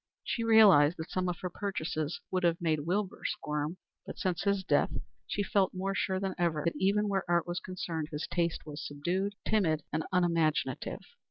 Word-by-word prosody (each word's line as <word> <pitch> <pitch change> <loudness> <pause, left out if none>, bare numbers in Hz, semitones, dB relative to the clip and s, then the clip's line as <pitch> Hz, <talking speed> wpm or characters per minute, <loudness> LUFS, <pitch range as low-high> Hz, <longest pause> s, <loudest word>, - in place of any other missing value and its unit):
She 230 - -2
realized 200 -9 +7
that 160 - -6
some 185 -1 0
of 175 - -2
her 180 - -2
purchases 160 -6 -3
would 185 -1 +1
have 170 -1 +2
made 155 -3 0
Wilbur 195 +2 -1
squirm, 150 +3 -2 0.3
but - - -8
since 180 -3 -1
his 200 -1 +1
death - - +3 0.4
she 205 - -1
felt 195 -1 +1
more 195 +1 -1
sure 190 -1 0
than 195 -1 -2
ever 165 -3 +1
that 170 - +1
even 205 +2 +2
where 195 -2 0
art 170 -1 +3
was 175 0 -3
concerned 165 -4 -4
his 150 -1 -3
taste 170 -2 -1
was 150 -1 -7
subdued, 180 +8 -2
timid, 165 -9 +2
and 155 +1 0
unimaginative. 170 -4 +1
175 Hz, 185 wpm, -31 LUFS, 160-195 Hz, 0.4 s, realized